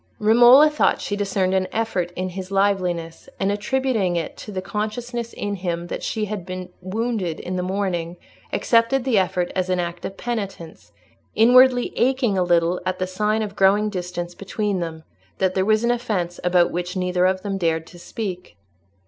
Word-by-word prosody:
Romola 240 +7 +7
thought 300 0 +2
she 205 - -3
discerned 195 -2 0
an 190 -1 +1
effort 195 -6 -1
in 185 +1 -2
his 185 +1 -7
liveliness, 185 -4 -1
and 195 +1 +1
attributing 215 -3 0
it 170 -2 -3
to 210 - -9
the 190 - -3
consciousness 230 +4 -4
in 205 0 -4
him 175 -2 -3
that - - -5
she 220 -2 -2
had 210 -3 -5
been 185 0 -6
wounded 195 -3 -2
in 185 - -5
the 180 - -1
morning, 180 -2 -2 0.3
accepted 235 +3 +2
the 245 -6 +3
effort 180 -1 -1
as 185 -1 -1
an 185 -1 +1
act 175 0 -4
of 195 - -6
penitence, 200 -8 -5 0.4
inwardly 250 +2 +5
aching 255 -4 +2
a 185 - +1
little 175 0 +2
at 185 0 -2
that 185 - -1
sign 210 +3 0
of 200 -2 -6
growing 205 +2 +3
distance 180 -2 -4
between 200 +1 -2
them—that 170 +3 -4
there 190 0 +1
was 215 +1 +2
an 235 - +3
offence 205 -8 -2
about 180 -1 +3
which 180 +2 -3
neither 180 0 +2
of 185 0 -1
them 195 -2 -3
dared 165 -2 0
to 175 - -14
speak. 185 -1 -6
190 Hz, 180 wpm, -22 LUFS, 180-215 Hz, 0.4 s, Romola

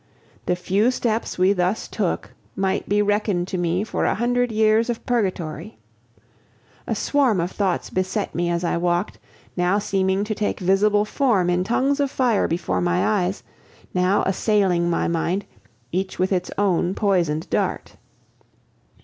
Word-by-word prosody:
The 180 - +2
few 190 +6 +1
steps 230 -3 -1
we 185 +2 +4
thus 180 +2 -1
took 195 -6 -3 0.2
might 190 0 -1
be 205 +1 +3
reckoned 205 -3 0
to 185 - -2
me 175 +2 0
for 220 - -2
a - - +1
hundred 245 +2 0
years 220 +1 +3
of 235 - -3
purgatory. 195 -4 -2 1.1
A - - -1
swarm 265 -9 +2
of 170 +2 -1
thoughts 190 -4 -1
beset 185 +2 -2
me 175 0 -1
as 170 0 -1
I 170 - 0
walked, 175 +2 -1 0.4
now 180 +2 +2
seeming 195 -1 0
to 215 +1 -2
take 210 0 -2
visible 205 +3 +3
form 210 -8 +1
in 180 +1 +1
tongues 265 +7 +1
of 280 -1 +1
fire 245 -5 +1
before 170 0 -1
my 175 +1 +1 0.2
eyes, 190 +2 -4 0.5
now 180 +2 +2
assailing 190 -3 +1
my 170 - 0
mind, 170 +4 -1 0.5
each 190 +2 -2
with 185 +1 0
its 180 -2 0
own 190 -2 +1
poisoned 170 -6 0
dart. - - -1
195 Hz, 155 wpm, -22 LUFS, 180-215 Hz, 1.1 s, we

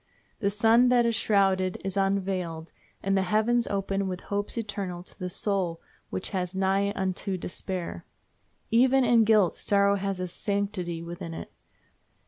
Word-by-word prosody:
The 200 - +1
sun 225 +4 +4
that 245 -1 +4
is 230 - +2
shrouded 195 -4 +2
is 195 -1 -3
unveiled, 190 -4 -1 0.3
and 195 0 +1
the 195 - +3
heavens 220 +5 +2
open 195 0 -1
with 180 -1 -3
hopes 205 +3 -3
eternal 200 -5 -4
to - - -16
the 180 - -3
soul 180 -3 -1 0.3
which 185 - -4
was 185 -1 -2
nigh 195 +1 +1
unto 190 0 -2
despair. 180 0 -4 0.7
Even 260 +3 +5
in 235 -2 +5
guilt 210 -5 +4
sorrow 200 0 +2
has 195 -1 -2
a 180 - -2
sanctity 190 -3 -2
within 170 -1 -6
it. - - -8
195 Hz, 150 wpm, -27 LUFS, 185-210 Hz, 0.7 s, Even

